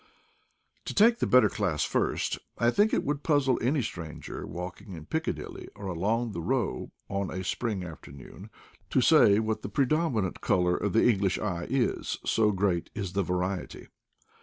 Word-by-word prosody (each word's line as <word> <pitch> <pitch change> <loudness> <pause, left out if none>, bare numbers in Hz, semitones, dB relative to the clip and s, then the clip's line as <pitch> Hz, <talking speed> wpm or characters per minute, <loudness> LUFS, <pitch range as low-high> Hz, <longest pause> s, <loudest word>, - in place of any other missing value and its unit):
To - - -5
take 230 +3 +5
the - - +1
better 125 0 +6
class 90 -9 -1
first. - - 0 0.2
I 120 0 +3
think 205 - +3
it - - +1
would 145 0 -2
puzzle 145 -5 +2
any 130 +3 +1
stranger, 85 -7 -6
walking 90 +2 -7
in 80 -3 -9
Piccadilly 90 - -4
or 100 - -9
along 105 +6 -1
the 85 - -5
Row - - -1 0.2
on 100 -1 -2
a 95 +1 -4
spring 100 0 -2
afternoon, 70 -5 -11 0.4
to - - +2
say 100 - +6
what 110 0 -1
the - - -5
predominant 130 - 0
color 90 -1 +2
of 100 -1 -2
the 115 - +4
English 100 -5 +2
eye 90 -5 -3
is, 130 -2 0
so 110 -1 +3
great 95 -3 0
is 95 -4 -4
the 100 - +1
variety. 90 0 -3
100 Hz, 165 wpm, -28 LUFS, 90-120 Hz, 0.4 s, better